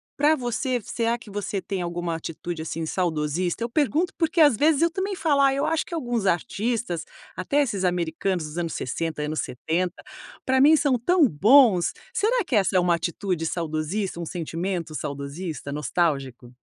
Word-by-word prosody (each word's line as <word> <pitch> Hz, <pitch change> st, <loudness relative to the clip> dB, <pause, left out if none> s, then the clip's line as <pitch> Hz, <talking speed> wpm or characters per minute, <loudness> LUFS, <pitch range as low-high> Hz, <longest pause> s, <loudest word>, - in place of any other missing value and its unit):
pra 300 Hz, +2 st, +4 dB
você, 250 Hz, 0 st, -1 dB
será 230 Hz, +2 st, -1 dB
que 230 Hz, -, -14 dB
você 205 Hz, 0 st, -3 dB
tem 190 Hz, -1 st, -4 dB
alguma 175 Hz, -1 st, -3 dB
atitude, 165 Hz, +1 st, -5 dB
assim, 165 Hz, 0 st, -4 dB
saudosista? 170 Hz, +3 st, -1 dB
Eu 235 Hz, -, -2 dB
pergunto, 305 Hz, +7 st, +1 dB
porque, 330 Hz, 0 st, 0 dB
às 295 Hz, -6 st, +7 dB
vezes, 295 Hz, +5 st, +3 dB
eu 335 Hz, -, +3 dB
também 390 Hz, +2 st, -2 dB
falo, 295 Hz, -6 st, +2 dB
ah, 275 Hz, -1 st, +5 dB
eu 275 Hz, +1 st, 0 dB
acho 325 Hz, -1 st, 0 dB
que -, -, -10 dB
alguns 240 Hz, -9 st, -2 dB
artistas, 195 Hz, +1 st, -1 dB, 0.3 s
até 280 Hz, +11 st, +1 dB
esses 210 Hz, -9 st, -1 dB
americanos 175 Hz, 0 st, -1 dB
dos 150 Hz, +2 st, -8 dB
anos 170 Hz, -2 st, -2 dB
60, 155 Hz, +3 st, -3 dB
anos 155 Hz, +1 st, -2 dB
70, 170 Hz, +7 st, -3 dB, 0.4 s
pra 260 Hz, 0 st, +3 dB
mim 300 Hz, +3 st, +7 dB
são 285 Hz, -4 st, +2 dB
tão 330 Hz, +5 st, +4 dB
bons. 210 Hz, -, +5 dB, 0.2 s
Será 470 Hz, +3 st, +1 dB
que 260 Hz, -, -1 dB
essa 195 Hz, -2 st, +2 dB
é -, -, +6 dB
uma 175 Hz, -1 st, +3 dB
atitude 170 Hz, 0 st, -2 dB
saudosista, 165 Hz, +4 st, -2 dB
um 170 Hz, -, -4 dB
sentimento 170 Hz, 0 st, -4 dB
saudosista, 145 Hz, +2 st, -5 dB
nostálgico? 140 Hz, -5 st, -2 dB
185 Hz, 175 wpm, -25 LUFS, 165-265 Hz, 0.4 s, às